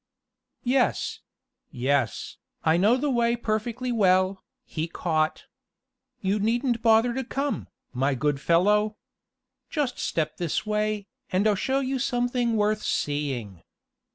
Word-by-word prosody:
"Yes 255 Hz, 0 st, +1 dB, 0.5 s
yes, 130 Hz, -2 st, -1 dB, 0.3 s
I 160 Hz, 0 st, +4 dB
know 210 Hz, +8 st, +4 dB
the 285 Hz, +2 st, 0 dB
way 235 Hz, -1 st, +2 dB
in -, -, -2 dB
perfectly 235 Hz, +3 st, -2 dB
well," 185 Hz, -3 st, +3 dB, 0.2 s
he 160 Hz, 0 st, -3 dB
caught. 160 Hz, -2 st, -1 dB, 0.8 s
"You 195 Hz, +2 st, +1 dB
needn't 235 Hz, +2 st, +1 dB
bother 225 Hz, +1 st, +4 dB
to 265 Hz, +2 st, -2 dB
come, 275 Hz, +3 st, -2 dB, 0.3 s
my 135 Hz, +2 st, +1 dB
good 140 Hz, +1 st, 0 dB
fellow. 210 Hz, +7 st, +3 dB, 0.7 s
Just 290 Hz, -5 st, -1 dB
step 160 Hz, -2 st, -1 dB
this 175 Hz, +2 st, -1 dB
way, 210 Hz, -1 st, -1 dB, 0.3 s
and 185 Hz, +3 st, +2 dB
I'll 215 Hz, -, +4 dB
show 265 Hz, +7 st, 0 dB
you 265 Hz, 0 st, -1 dB
something 245 Hz, -1 st, 0 dB
worth 210 Hz, 0 st, +1 dB
seeing." 135 Hz, -, -2 dB
210 Hz, 125 wpm, -26 LUFS, 165-240 Hz, 0.8 s, I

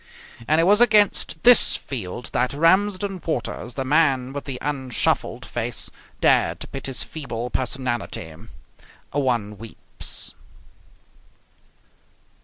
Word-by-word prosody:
And 155 Hz, +1 st, +3 dB
it -, -, +4 dB
was 205 Hz, +5 st, +5 dB
against 210 Hz, -8 st, +3 dB
this 245 Hz, -1 st, +8 dB
field 120 Hz, -2 st, -6 dB
that 125 Hz, +2 st, 0 dB
Ramsden 190 Hz, +3 st, +2 dB
Waters, 120 Hz, -5 st, -4 dB
the 135 Hz, -, -3 dB
man 135 Hz, -3 st, +2 dB
with 145 Hz, -, -6 dB
the 135 Hz, -3 st, -4 dB
unshuffled 135 Hz, -4 st, -1 dB
face, -, -, -3 dB, 0.3 s
dared -, -, +2 dB
to -, -, -6 dB
pit 135 Hz, -, -6 dB
his 130 Hz, -5 st, -1 dB
feeble 125 Hz, -6 st, -5 dB
personality. 125 Hz, -10 st, -3 dB, 0.8 s
One 120 Hz, -7 st, -1 dB
weeps. 115 Hz, 0 st, -6 dB
135 Hz, 110 wpm, -23 LUFS, 125-165 Hz, 0.8 s, this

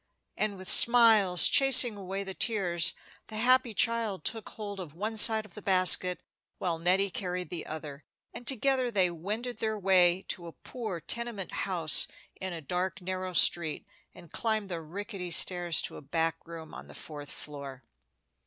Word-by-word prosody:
And 210 Hz, -2 st, -3 dB
with 185 Hz, 0 st, -11 dB
smiles 220 Hz, -8 st, +7 dB
chasing 260 Hz, -4 st, +4 dB
away 195 Hz, 0 st, -6 dB
the 190 Hz, -1 st, -6 dB
tears, 185 Hz, -6 st, 0 dB, 0.3 s
the 215 Hz, -, -7 dB
happy 250 Hz, 0 st, +2 dB
child 230 Hz, -4 st, 0 dB
took 225 Hz, -2 st, -4 dB
hold 205 Hz, -2 st, -9 dB
of 165 Hz, -5 st, -9 dB
one 215 Hz, +5 st, -5 dB
side 220 Hz, 0 st, +4 dB
of 200 Hz, -, -16 dB
the 210 Hz, -, -10 dB
basket, 185 Hz, -1 st, +4 dB, 0.4 s
while 170 Hz, -3 st, -3 dB
Nettie 185 Hz, +3 st, 0 dB
carried 180 Hz, -1 st, -5 dB
the 175 Hz, -2 st, -7 dB
other, 150 Hz, -2 st, -9 dB, 0.3 s
and 245 Hz, -, -10 dB
together 265 Hz, -1 st, +1 dB
they 190 Hz, -6 st, +1 dB
wended 210 Hz, +9 st, -6 dB
their 220 Hz, -1 st, -3 dB
way 185 Hz, -2 st, +2 dB
to 175 Hz, -1 st, -5 dB
a 165 Hz, -, -11 dB
poor 215 Hz, -9 st, -8 dB
tenement 230 Hz, +1 st, -5 dB, 0.2 s
house 160 Hz, -7 st, +4 dB, 0.3 s
in 190 Hz, 0 st, -7 dB
a 170 Hz, -2 st, -8 dB
dark 180 Hz, +5 st, -4 dB
narrow 185 Hz, 0 st, -6 dB
street, 170 Hz, -2 st, +2 dB, 0.3 s
and 170 Hz, -, -17 dB
climbed 215 Hz, -3 st, -2 dB
the 170 Hz, -2 st, -5 dB
rickety 185 Hz, +3 st, -8 dB
stairs 175 Hz, 0 st, +1 dB
to -, -, -6 dB
a -, -, -11 dB
back 165 Hz, +3 st, -3 dB
room 165 Hz, -2 st, -11 dB
on -, -, -11 dB
the -, -, -14 dB
fourth 145 Hz, -2 st, -10 dB
floor. 140 Hz, -3 st, -9 dB
185 Hz, 170 wpm, -28 LUFS, 170-215 Hz, 0.4 s, smiles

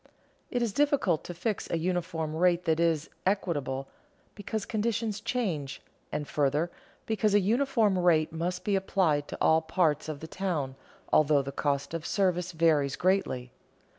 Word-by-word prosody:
It 245 Hz, -1 st, 0 dB
is 225 Hz, -4 st, -1 dB
difficult 285 Hz, -, +2 dB
to 175 Hz, -, -5 dB
fix 205 Hz, +4 st, -2 dB
a 170 Hz, -, 0 dB
uniform 165 Hz, -2 st, -2 dB
rate 175 Hz, +1 st, +2 dB
that 160 Hz, -1 st, +2 dB
is 165 Hz, -2 st, +1 dB, 0.2 s
equitable, 145 Hz, -9 st, -1 dB, 0.5 s
because 210 Hz, 0 st, -4 dB
conditions 220 Hz, -1 st, -1 dB
change, 165 Hz, -, -2 dB, 0.3 s
and, 150 Hz, -1 st, -3 dB
further, 150 Hz, +4 st, +1 dB, 0.3 s
because 215 Hz, -1 st, +1 dB
a -, -, +7 dB
uniform 225 Hz, -2 st, +2 dB
rate 165 Hz, -3 st, +3 dB
must 175 Hz, +2 st, -2 dB
be 205 Hz, -, +1 dB
applied 175 Hz, -6 st, +1 dB
to -, -, -6 dB
all 160 Hz, 0 st, +4 dB
parts 160 Hz, -2 st, +1 dB
of 150 Hz, -2 st, -5 dB
the 160 Hz, -, -8 dB
town, 160 Hz, -8 st, -2 dB, 0.4 s
although 150 Hz, -2 st, +4 dB
the 140 Hz, -, -5 dB
cost 140 Hz, +1 st, -1 dB
of 165 Hz, -1 st, -4 dB
service 185 Hz, -3 st, +1 dB
varies 155 Hz, -5 st, +2 dB
greatly. 175 Hz, -10 st, 0 dB
170 Hz, 155 wpm, -29 LUFS, 155-195 Hz, 0.5 s, a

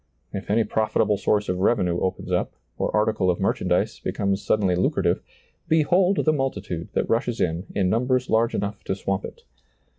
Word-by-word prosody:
If 100 Hz, -, -6 dB
any 110 Hz, +2 st, +3 dB
profit 110 Hz, 0 st, -1 dB
able 105 Hz, -1 st, +1 dB
source 105 Hz, 0 st, +1 dB
of 90 Hz, 0 st, -1 dB
revenue 90 Hz, -4 st, +2 dB
opens 95 Hz, 0 st, -3 dB
up, -, -, -1 dB, 0.2 s
or -, -, -1 dB
article 105 Hz, -3 st, +1 dB
of 90 Hz, -, +1 dB
merchandise 90 Hz, -2 st, 0 dB
becomes 100 Hz, 0 st, -1 dB
suddenly 95 Hz, -4 st, +1 dB
lucrative, 90 Hz, -, +1 dB, 0.5 s
behold 175 Hz, +4 st, +3 dB
the 155 Hz, -, +4 dB
multitude 100 Hz, -, -3 dB
that -, -, 0 dB
rushes -, -, 0 dB
in, 85 Hz, +4 st, -1 dB
in 95 Hz, -2 st, +2 dB
numbers 125 Hz, +5 st, +1 dB
large 115 Hz, +1 st, +2 dB
enough 100 Hz, 0 st, -3 dB
to 95 Hz, -, -1 dB
swamp 95 Hz, 0 st, -2 dB
it. -, -, -10 dB
105 Hz, 175 wpm, -24 LUFS, 95-115 Hz, 0.5 s, the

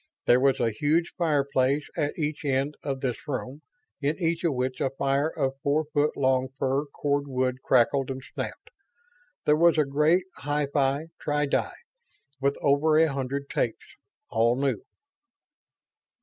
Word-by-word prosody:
There 120 Hz, -, +5 dB
was 135 Hz, 0 st, +3 dB
a 115 Hz, -, +1 dB
huge 155 Hz, +9 st, 0 dB
fireplace 140 Hz, -4 st, +1 dB
at 150 Hz, -3 st, -1 dB
each 155 Hz, -1 st, -2 dB
end 140 Hz, +1 st, 0 dB
of 135 Hz, -2 st, -3 dB
this 125 Hz, +1 st, -3 dB
room, 135 Hz, +1 st, -4 dB, 0.4 s
in 145 Hz, +2 st, 0 dB
each 165 Hz, -1 st, 0 dB
of 165 Hz, -5 st, +1 dB
which 125 Hz, 0 st, -2 dB
a 135 Hz, -, +2 dB
fire 140 Hz, +2 st, 0 dB
of 135 Hz, -3 st, -2 dB
four 155 Hz, +1 st, +1 dB
foot 150 Hz, +1 st, +1 dB
long 130 Hz, -1 st, +2 dB
fir 135 Hz, +2 st, 0 dB
cordwood 140 Hz, -3 st, -1 dB
crackled 130 Hz, +2 st, +2 dB
and 130 Hz, 0 st, -5 dB
snapped. 455 Hz, -, -6 dB, 0.7 s
There 150 Hz, -, +5 dB
was 170 Hz, +1 st, +4 dB
a 155 Hz, -, +4 dB
great 150 Hz, +6 st, +2 dB
hi 145 Hz, 0 st, -1 dB
fi 140 Hz, +2 st, +1 dB
tri 150 Hz, 0 st, 0 dB
di, 140 Hz, -, 0 dB, 0.7 s
with 140 Hz, +1 st, 0 dB
over 150 Hz, +2 st, +3 dB
a 160 Hz, -2 st, +4 dB
hundred 140 Hz, +1 st, -3 dB
tapes, 115 Hz, -, -2 dB, 0.4 s
all 115 Hz, +2 st, +2 dB
new. 135 Hz, -6 st, 0 dB
140 Hz, 150 wpm, -26 LUFS, 130-150 Hz, 0.7 s, There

